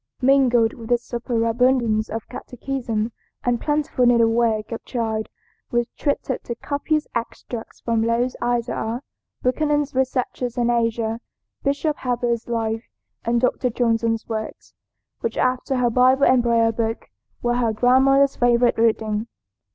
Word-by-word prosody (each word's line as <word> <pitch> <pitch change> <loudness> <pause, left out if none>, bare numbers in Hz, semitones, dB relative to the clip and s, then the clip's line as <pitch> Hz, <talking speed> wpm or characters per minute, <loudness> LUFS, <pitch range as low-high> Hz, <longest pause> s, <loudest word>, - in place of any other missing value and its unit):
Mingled 250 -4 +4
with 230 -1 -10
this 240 0 +2
superabundance 235 -1 +1
of 225 +1 -5
catechism 240 -3 -4 0.3
and 245 -1 0
plentiful 295 -4 0
needlework 230 -2 +3
the 230 - -4
child 220 -3 -2 0.4
was 240 -2 0
treated 280 -3 -2
to 235 - -4
copious 295 +4 -1
extracts 235 0 -6
from 230 -1 0
Lowth's 235 +2 0
Isaiah, 240 0 -1 0.4
Buchanan's 295 +2 +1
Researches 255 -1 -1
in 240 0 +2
Asia, 230 -1 0 0.4
Bishop 290 +2 0
Heber's 240 -2 -1
Life, 225 -1 -2 0.4
and 235 +1 +2
Dr. 250 +1 +1
Johnson's 230 -1 0
Works, 220 -1 -6 0.5
which, - - -3
after 255 +1 0
her 245 -2 +2
Bible 255 +3 +4
and 255 -1 +5
Prayer 230 -1 +3
Book, 225 0 -3 0.3
were 240 0 +1
her 235 -2 +1
grandmother's 265 +4 +4
favorite 240 -1 +3
reading. 220 -1 +1
240 Hz, 130 wpm, -22 LUFS, 230-255 Hz, 0.5 s, and